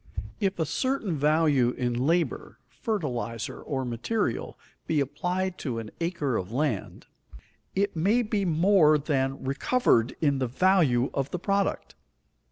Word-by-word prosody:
If 195 -2 0
a 160 - 0
certain 255 - -1
value 145 -4 +3
in 125 -1 0
labor, 160 +8 0
fertilizer, 125 - -3
or 135 -3 -3
material, 125 - -2 0.3
be 155 - +1
applied 180 +7 -2
to 125 -6 -3
an 110 -2 -6
acre 165 -8 -1
of 95 +2 -5
land, 130 -4 -2 0.7
it 200 0 0
may 205 +9 +2
be 210 -2 -1
more 170 -2 +4
than 135 -2 -1
recovered 135 - +2
in 140 -3 +2
the 130 - 0
value 140 -4 +3
of 135 -1 -1
the - - -3
product. 200 +2 -1
155 Hz, 135 wpm, -27 LUFS, 130-190 Hz, 0.7 s, more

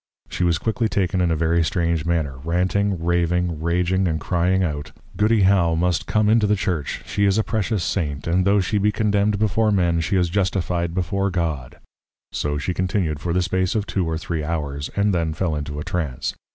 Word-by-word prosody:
_ - - -27
She - - -1
was 85 -2 +2
quickly 110 +3 -1
taken 95 -2 0
in 90 - +2
a 80 - +2
very 80 +1 +2
strange 85 -3 0
manner, 80 -6 -1
Ranting, 90 +3 0
Raving, 85 -1 0
Raging 90 +3 +1
and 80 -2 -1
crying 90 +3 +1
out, 75 -4 -3 0.2
_Goody 105 0 +3
+How+ 95 -4 +3
must 85 -1 0
come 105 -1 +2
into 110 -1 +4
the 105 - +3
Church; 90 -7 -3
she 100 0 0
is 100 +1 +3
a 110 - +2
precious 110 -3 -1
Saint; 75 -7 -2
and 90 +2 +2
tho' 100 +1 +3
she 100 +3 0
be 105 +1 +2
condemned 105 -1 +1
before 110 +1 +2
Men, 85 -4 +2
she 95 +4 -1
is 90 -2 +2
Justify'd 90 -3 -1
before 95 +2 0
God._ 80 -9 -3 0.6
So 75 0 -2
she 75 +5 -2
continued 90 -5 -1
for 85 +3 -3
the 90 +1 +1
space 95 +3 0
of 105 -2 0
two 90 -6 -1
or 80 - -1
three 80 -1 -3
Hours; 75 -3 -3
and 100 0 +2
then 80 -3 -1
fell 85 -4 -1
into 75 0 -4
a - - -4
Trance. 75 -9 -3
90 Hz, 205 wpm, -22 LUFS, 80-100 Hz, 0.6 s, into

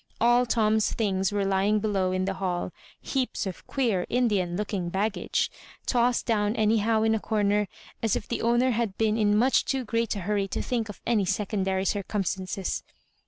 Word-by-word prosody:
AU 240 +1 +4
Tom's 220 -2 +2
things 195 -3 0
were 205 -1 0
lying 195 +2 +2
below 195 -3 0
in 185 0 0
the 195 - -1
hall 180 -2 -1 0.2
— - - -27
Cheaps 260 -4 -1
of 185 -3 -7
queer 225 -10 0
Indian 205 -8 +1
looking 200 -4 -2
bag 200 +4 0
gage - - -1 0.2
— - - -23
^tossed 245 -1 +2
down 210 -1 +1
anyhow 220 0 +2
in 220 0 +3
a 220 - +1
comer, 210 -1 +1 0.3
as 225 -3 +1
if - - -4
the 235 - -2
owner 240 +2 +3
had 225 -4 -1
been 220 -1 +2
in 210 -2 +3
much 255 +4 +4
too 265 -2 -2
great 230 0 0
a 200 - -4
hurry 200 +1 0
to - - -3
think 235 -4 -2
of 210 - -9
any 220 -5 +2
secondary 190 -1 -1
circumstances. 195 -1 -2
210 Hz, 190 wpm, -27 LUFS, 195-230 Hz, 0.3 s, AU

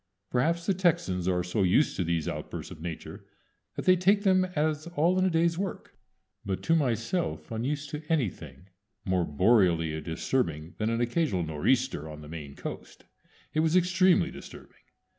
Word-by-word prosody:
Perhaps 165 +7 +1
the 195 - +2
Texans 155 - +1
are 90 -1 +1
so 90 +4 -1
used 95 +11 +3
to 90 - 0
these 85 -2 -1
outbursts - - -5
of 80 - -10
Nature 85 -1 -7 0.5
that - - -5
they 185 - +6
take 195 +3 +3
them 185 -2 +4
as 155 +1 0
all 170 +4 +3
in - - +2
the 190 - +3
day's 165 0 +1
work; 195 -1 -5 0.5
but 95 -2 -3
to 165 - +3
myself, 130 +3 -1
unused 140 +6 -3
to 150 -1 -4
anything 90 - -2 0.4
more 95 -2 +1
boreally 85 -2 +2
disturbing 80 - -2
than 110 +1 0
an 115 +1 0
occasional 120 - 0
nor'easter 80 - 0
on 75 0 -9
the 75 - -10
Maine 75 -3 -8
Coast, - - -8 0.5
it 155 - +1
was 160 +1 +2
extremely 185 0 +4
disturbing. - - -12
120 Hz, 165 wpm, -28 LUFS, -, 0.5 s, they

